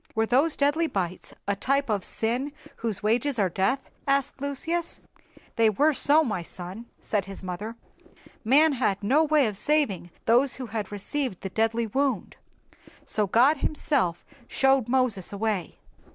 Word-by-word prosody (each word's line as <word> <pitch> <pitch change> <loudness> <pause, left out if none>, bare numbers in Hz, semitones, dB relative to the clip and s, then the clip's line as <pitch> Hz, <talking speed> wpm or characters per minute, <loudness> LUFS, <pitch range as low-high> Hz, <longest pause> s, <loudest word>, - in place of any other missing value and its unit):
"Were 220 0 +2
those 275 +7 +2
deadly 295 +4 +2
bites 185 - -4 0.2
a 200 - +1
type 275 +7 0
of 205 -4 -1
sin 250 +6 -2 0.2
whose 220 -3 -3
wages 245 +5 +1
are 195 -3 +2
death?" 230 +10 -1 0.2
asked 275 -1 0
Lucius. 325 +5 -3 0.6
"They 225 -1 +5
were 295 +9 +3
so, 295 +3 +4
my 215 - -2
son," 185 +7 -8
said 205 -3 -1
his 195 0 -9
mother. 200 +5 -5 0.7
"Man 290 +7 +5
had 205 -6 0
no 275 +10 +4
way 305 -3 +3
of 210 -3 -3
saving 260 -11 0 0.2
those 245 +4 +3
who 260 - -5
had 220 -3 -4
received 205 +1 -3
the 195 - -4
deadly 225 +3 0
wound, 265 -1 -1 0.7
so 210 -2 0
God 255 +10 +4
himself 270 - 0 0.2
showed 270 -3 +2
Moses 245 -7 +1
a 200 - -6
way. 205 -5 -2
235 Hz, 155 wpm, -26 LUFS, 200-280 Hz, 0.7 s, They